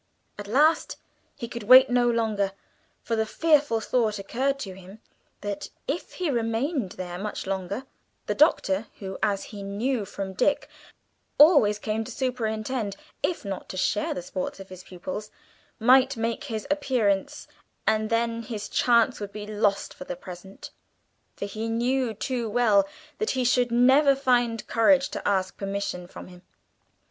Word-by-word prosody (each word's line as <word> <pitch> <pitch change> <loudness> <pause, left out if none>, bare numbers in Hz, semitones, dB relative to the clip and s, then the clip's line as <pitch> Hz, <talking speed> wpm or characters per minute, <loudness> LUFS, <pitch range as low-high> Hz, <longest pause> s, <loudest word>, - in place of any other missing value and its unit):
At 205 - -6
last 300 +9 +3 0.4
he 240 -4 -6
could 235 0 -6
wait 255 +5 +8
no 245 -1 +3
longer, 215 -4 0 0.5
for 230 - -1
the 220 - +2
fearful 290 -4 +2
thought 220 -2 0
occurred 260 +8 -1
to 195 -6 -5
him, 190 +2 -13 0.4
that 200 -1 -4 0.2
if 295 +6 -3
he 355 -5 -1
remained 230 - -1
there 180 -1 -6
much 210 +2 -4
longer, 195 +5 -3 0.4
the - - -1
Doctor 220 - +2
who, 190 -1 -7
as 200 -1 +1
he 205 - -7
knew 210 +5 -1
from 195 0 -6
Dick, 285 +9 +1 0.7
always 285 - +6
came 215 +1 -2
to - - -9
superintend, 225 -3 -2 0.3
if 345 - -2
not 195 -1 -5
to 185 - -6
share 205 +3 0
the 180 - -5
sports 185 +2 -5
of 195 - -10
his 185 -1 -10
pupils 210 +4 -7 0.5
might 260 +3 +5
make 230 0 -2
his 220 -2 -4
appearance, 240 -9 0 0.4
and 220 0 +1
then 230 0 0
his 215 -2 -6
chance 240 0 +3
would 205 -1 -6
be 210 0 -7
lost 210 -1 0
for 180 - -10
the 180 - -5
present, 180 +2 -10 0.6
for - - -4
he 220 +3 -4
knew 240 0 0
too 235 +1 -2
well 210 -4 +3 0.3
that 435 - 0
he 255 - +2
should 245 0 +3
never 265 +4 +5
find 245 -4 +1
courage 270 +4 +3
to - - -4
ask 190 -2 0
permission 195 -3 -4
from - - -10
him. 180 -1 -14
220 Hz, 160 wpm, -26 LUFS, 200-250 Hz, 0.7 s, wait